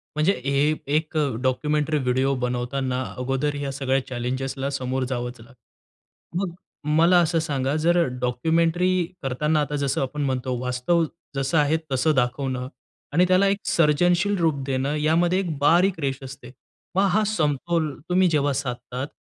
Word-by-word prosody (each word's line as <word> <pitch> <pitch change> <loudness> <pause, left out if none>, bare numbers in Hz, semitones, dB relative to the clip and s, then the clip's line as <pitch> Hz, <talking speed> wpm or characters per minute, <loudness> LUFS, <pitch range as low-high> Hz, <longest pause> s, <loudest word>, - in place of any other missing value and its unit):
म्हणजे 155 +6 +3
हे 140 +2 +2 0.2
एक 155 0 -1
अ, 145 -5 +1
डॉक्युमेंटरी 150 +4 +1
व्हिडिओ 130 +2 +1
बनवताना 125 +1 -2 0.2
अगोदर 135 +3 -1
या 140 -1 -2
सगळ्या 135 -1 -1
चॅलेंजेसला 130 +2 -3
समोर 130 -1 -2
जावंच 120 -1 -4
लागतं. 125 +7 -15
मग 175 -3 -4 0.4
मला 170 +2 +5
असं 165 0 +1
सांगा, 140 -3 -1
जर 175 0 +4 0.2
डॉक्युमेंटरी 165 +8 +1 0.3
करताना 150 +4 +1
आता 145 0 -2
जसं 140 -2 0
आपण 145 +2 -3
म्हणतो 130 -1 -1
वास्तव 125 +7 +1 0.3
जसं 135 +4 0
आहे 150 +1 +3
तसं 135 +4 +2
दाखवणं 125 0 -1 0.5
आणि 175 +4 +5
त्याला 185 +2 +4
एक 195 0 +2
सर्जनशील 175 +3 +3
रूप 155 -5 +1
देणं 135 +2 -1
यामध्ये 170 +5 +2
एक 170 -6 -3
बारीक 175 +4 +3
रेष 135 -2 -1
असते. 130 -2 -10 0.4
मग 195 +1 +4
हा 215 +2 +3
समतोल 160 -3 0 0.2
तुम्ही 185 +1 +4
जेव्हा 145 -3 +1
साधतात, 125 -1 -4
145 Hz, 145 wpm, -24 LUFS, 130-165 Hz, 0.5 s, मला